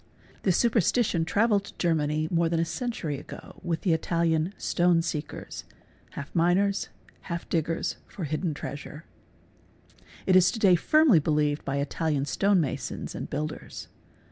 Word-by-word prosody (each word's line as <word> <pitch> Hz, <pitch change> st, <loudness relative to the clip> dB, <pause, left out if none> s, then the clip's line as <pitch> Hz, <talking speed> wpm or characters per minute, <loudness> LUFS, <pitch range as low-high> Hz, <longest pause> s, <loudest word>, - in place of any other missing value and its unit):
This 185 Hz, -3 st, +2 dB
super 235 Hz, -1 st, +3 dB
stition 190 Hz, -4 st, +1 dB
travelled 205 Hz, +1 st, +2 dB
to -, -, -13 dB
Germany 155 Hz, -2 st, +1 dB
more 170 Hz, -1 st, +2 dB
than 165 Hz, 0 st, 0 dB
a 165 Hz, -, +2 dB
century 170 Hz, -, -3 dB
ago -, -, -11 dB
with 170 Hz, -3 st, -2 dB
the 180 Hz, -, +2 dB
Italian 165 Hz, +1 st, +1 dB
| -, -, -32 dB
"'stone 175 Hz, -1 st, +2 dB
seekers'' 150 Hz, -2 st, -5 dB, 0.5 s
(half 140 Hz, +1 st, -7 dB
miners, 180 Hz, +4 st, +2 dB, 0.4 s
half 170 Hz, -1 st, -4 dB
diggers 165 Hz, 0 st, -1 dB
for 185 Hz, -, -7 dB
hidden 155 Hz, +1 st, -2 dB
treasure). 150 Hz, +2 st, -7 dB, 1.2 s
It 185 Hz, -, +4 dB
is; 185 Hz, 0 st, +6 dB
to -, -, -4 dB
day 195 Hz, -4 st, +5 dB
firmly 295 Hz, -, +5 dB
believed 150 Hz, -1 st, 0 dB
by 135 Hz, -, -2 dB
Italian 145 Hz, 0 st, -1 dB
stone 195 Hz, +5 st, +2 dB
masons 145 Hz, -6 st, -3 dB
and -, -, -6 dB
builders. 155 Hz, +2 st, -5 dB
165 Hz, 150 wpm, -27 LUFS, 155-185 Hz, 1.2 s, is